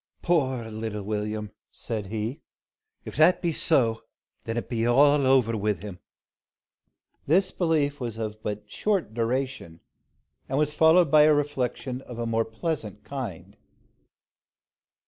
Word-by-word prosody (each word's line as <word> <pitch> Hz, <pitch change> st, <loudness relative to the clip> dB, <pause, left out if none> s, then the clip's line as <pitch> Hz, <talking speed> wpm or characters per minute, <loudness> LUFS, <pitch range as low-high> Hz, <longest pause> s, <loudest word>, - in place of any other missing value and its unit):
"Poor 130 Hz, -9 st, +1 dB
little 110 Hz, -1 st, -4 dB
Will'm!" 105 Hz, 0 st, -3 dB, 0.2 s
said 110 Hz, -4 st, -5 dB
he. 110 Hz, +6 st, -4 dB, 0.6 s
"If -, -, -8 dB
that 175 Hz, +4 st, +5 dB
be 170 Hz, -2 st, -1 dB
so, 115 Hz, -9 st, +2 dB, 0.4 s
then 115 Hz, +1 st, -3 dB
it 120 Hz, -, -3 dB
be 115 Hz, -2 st, -1 dB
all 140 Hz, +2 st, +5 dB
over 125 Hz, -4 st, +3 dB
wi' 105 Hz, 0 st, 0 dB
him." 95 Hz, 0 st, -9 dB, 1.3 s
This 185 Hz, +5 st, +3 dB
belief 150 Hz, -5 st, 0 dB
was 120 Hz, -4 st, -5 dB
but 110 Hz, -1 st, -4 dB
of 105 Hz, -, -25 dB
short 185 Hz, -, -1 dB
duration, 120 Hz, -7 st, -2 dB, 0.7 s
and 135 Hz, -, -1 dB
was 150 Hz, 0 st, +1 dB
followed 160 Hz, 0 st, +5 dB
by 150 Hz, -1 st, +7 dB
a 155 Hz, -, +6 dB
reflection 130 Hz, -3 st, -2 dB
of 125 Hz, -3 st, -10 dB
a 120 Hz, -, -2 dB
more 115 Hz, 0 st, 0 dB
pleasant 110 Hz, -, -4 dB
kind. 125 Hz, -11 st, -7 dB
120 Hz, 135 wpm, -26 LUFS, 110-145 Hz, 1.3 s, by